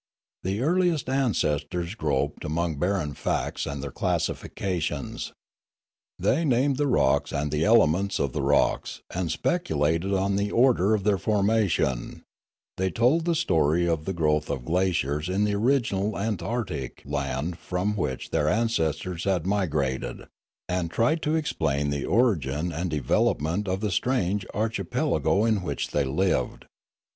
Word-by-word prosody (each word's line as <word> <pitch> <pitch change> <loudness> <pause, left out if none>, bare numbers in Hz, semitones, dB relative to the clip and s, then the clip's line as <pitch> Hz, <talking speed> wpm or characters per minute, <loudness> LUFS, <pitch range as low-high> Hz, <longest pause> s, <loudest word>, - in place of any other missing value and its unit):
The 95 +4 -2
earliest 170 -1 +2
ancestors 85 - 0
groped 75 - -1
amongst 80 -1 -1
barren 90 -5 0
facts - - -2
and 70 -1 -4
their 70 - -5
classifications. 80 -3 -2 0.9
They 160 +6 +1
named 135 -1 +2
the 145 0 +1
rocks 70 - +2
and 75 +1 -2
the 75 +1 +1
elements 100 -3 +3
of 70 -3 -1
the - - -1
rocks, - - +1
and 90 -2 -2
speculated 80 - 0
on 100 0 +1
the 100 0 0
order 115 -4 +4
of 100 - -3
their 100 -2 +2
formation; 100 - 0 0.5
they 95 0 +1
told 125 - +2
the 170 -1 +2
story 85 - +2
of 80 -2 -1
the 95 - -2
growth 75 -3 +1
of 65 -3 -3
glaciers 85 -2 0
in 95 +3 +1
the 105 0 +1
original 110 -3 +1
Antarctic 105 - -3
land 70 +4 -3
from 95 +4 -2
which 75 -10 -3
their 75 - +2
ancestors 90 -6 0
had 95 -4 +1
migrated, 75 -10 -1 0.4
and 90 -2 -1
tried 120 - +1
to 155 +2 +1
ex 155 -2 -2
plain 70 -1 0
the 70 -1 -2
origin 85 - +1
and 85 +3 -2
development 80 +5 0
of 95 +1 -1
the 105 -2 -1
strange 100 -3 0
archi 110 0 -1
pelago 100 +4 +1
in 110 -3 +2
which 90 - -3
they 75 - +1
lived. 90 +8 0
90 Hz, 145 wpm, -26 LUFS, 75-110 Hz, 0.9 s, order